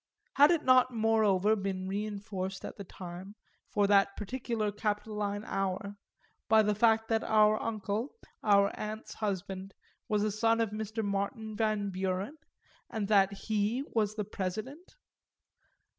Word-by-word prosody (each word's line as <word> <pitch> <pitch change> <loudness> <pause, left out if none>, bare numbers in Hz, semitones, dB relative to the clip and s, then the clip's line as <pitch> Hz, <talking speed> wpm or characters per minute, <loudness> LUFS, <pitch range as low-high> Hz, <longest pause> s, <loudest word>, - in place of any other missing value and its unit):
Had 290 +2 +7
it 335 -3 +2
not 255 -1 +5
moreover 220 -3 +3
been 190 -2 -3
reinforced 200 -1 -4
at - - -7
the 200 - -7
time, 185 +2 -9 0.3
for 205 -1 +2
that 200 0 +3
particular 225 -1 -2
Capitoline 210 0 -2
hour, 195 +1 -2 0.5
by 220 -1 +6
the 210 0 +2
fact 225 +1 +3
that 225 -1 +1
our 215 0 +4
uncle, 215 - -3 0.3
our 200 -2 +4
aunt's 215 +1 -5
husband, 195 -2 -4 0.3
was 210 -1 +1
a 215 - +1
son 225 +2 +2
of 225 -2 0
Mr. 220 +1 -3
Martin 205 +2 -2
Van 215 -2 0
Buren, 190 +7 -2 0.5
and 220 -3 -3
that 200 -2 +5
he 215 +5 -1
was 215 -2 +1
the 210 -1 -2
President? 215 - -5
210 Hz, 140 wpm, -31 LUFS, 200-220 Hz, 0.5 s, Had